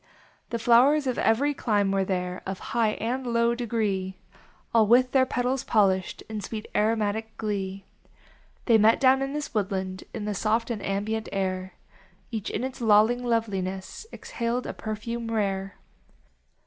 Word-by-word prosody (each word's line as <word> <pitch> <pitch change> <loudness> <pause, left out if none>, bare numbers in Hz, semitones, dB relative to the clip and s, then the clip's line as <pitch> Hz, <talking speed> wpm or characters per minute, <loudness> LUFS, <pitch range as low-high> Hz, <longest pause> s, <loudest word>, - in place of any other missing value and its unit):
The 235 - -2
flowers 250 +6 +4
of 255 -2 -1
every 280 +7 +2
clime 205 -7 +1
were 195 0 +1
there. 180 -1 -3
Of 190 0 -3 0.2
high 225 -3 +2
and 250 +3 -3
low 235 0 +2
degree. 210 -6 -2 0.6
All 225 -2 +5
with 250 +3 +5
their 260 -1 +4
petals 250 +1 -1
polished, 190 -4 +1
In 215 -1 -5
sweet 215 +2 -6
aromatic 220 0 0
glee. 195 -3 -3 0.8
They 230 -3 +5
met 220 +2 +5
down 265 0 +4
in 270 +1 -2
this 300 0 -4
woodland 190 -3 -2
In 215 -2 -5
the 210 - -1
soft 225 +4 0
and 215 -3 -3
ambient 210 +3 -2
air. 185 -1 -2 0.6
Ivach 215 -2 -3
in - - -3
its 260 0 -5
lolling 225 +2 +4
loveliness, 200 - -2
Exhaled 235 +1 -3
a - - -4
perfume 230 +2 -5
rare. 195 -3 -1
220 Hz, 150 wpm, -26 LUFS, 195-235 Hz, 0.8 s, All